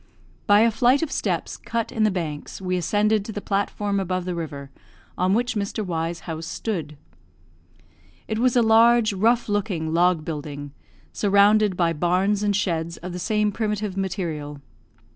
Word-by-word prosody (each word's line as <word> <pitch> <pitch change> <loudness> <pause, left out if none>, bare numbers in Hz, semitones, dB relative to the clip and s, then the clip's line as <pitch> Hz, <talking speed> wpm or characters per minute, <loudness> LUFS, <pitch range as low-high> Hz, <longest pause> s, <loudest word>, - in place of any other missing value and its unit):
By 205 0 +6
a 230 0 +4
flight 245 +6 +3
of 320 - -3
steps - - -2
cut 230 -1 -3
in 230 -3 -3
the 215 - +4
banks 160 -6 -5
we 185 -1 -2
ascended 205 +4 +1
to 220 - -7
the 205 - -4
platform 200 0 -1
above 185 -1 -2
the 180 - -2
river 145 -5 -6 0.4
on 185 +2 +1
which 245 +2 0
Mr. 205 0 -3
Y 165 -2 -2
's 170 - -9
house 160 -1 -6
stood. 160 -4 -4 1.3
It 220 - -2
was 250 +1 +2
a 240 - +5
large, 225 0 +5
rough 230 +5 +2
looking, 190 -7 -1
log 170 -2 +2
building, 145 -2 -6 0.4
surrounded 205 -1 +3
by 170 -2 +2
barns 185 +5 +1
and 205 -1 +1
sheds 170 -4 -1
of 180 +2 -7
the 180 - -5
same 210 +2 +1
primitive 210 -2 -2
material. 170 -7 -4
195 Hz, 165 wpm, -23 LUFS, 170-215 Hz, 1.3 s, By